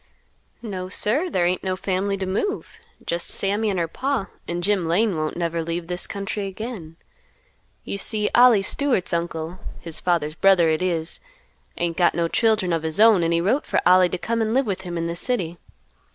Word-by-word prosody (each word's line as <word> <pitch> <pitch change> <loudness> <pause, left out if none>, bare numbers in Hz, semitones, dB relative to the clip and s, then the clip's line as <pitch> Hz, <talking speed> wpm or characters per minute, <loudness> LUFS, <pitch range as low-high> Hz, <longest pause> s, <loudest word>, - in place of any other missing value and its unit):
"No, 185 -4 -5
sir, 265 - 0
there 180 - +1
ain't 180 +1 0
no 185 -1 -1
family 195 +1 -1
to 190 - -3
move. 210 - -3 0.3
Just 170 0 -2
Sammy 205 +2 0
and 195 - -1
her 170 -1 0
Pa, 255 - -2 0.2
and 175 0 -3
Jim 195 -4 +1
Lane 195 +4 +2
won't 155 0 -3
never 170 -1 -1
leave 170 +1 -3
this 180 +1 -3
country 200 0 -4
again. 195 -5 -7 0.9
You 200 - -5
see 210 0 0
Ollie 240 -5 +6
Stewart's 250 -5 +1
uncle, 170 +1 -3 0.2
his 165 -2 -4
father's 165 -4 0
brother 175 0 +4
it 155 - 0
is, 170 -3 -1 0.6
ain't 170 -1 -2
got 175 -2 +3
no 170 -1 +1
children 215 -2 +1
of 165 - 0
his 160 +3 -1
own, 220 -4 +6
and 165 0 +1
he 170 0 +2
wrote 235 +11 0
for - - +1
Ollie 180 0 +6
to 180 - -3
come 230 +5 -2
and 220 +1 0
live 270 +1 +3
with 195 -3 -3
him 175 -2 -5
in 165 - -2
the 170 0 -3
city. 175 -5 -1
185 Hz, 195 wpm, -23 LUFS, 170-210 Hz, 0.9 s, Ollie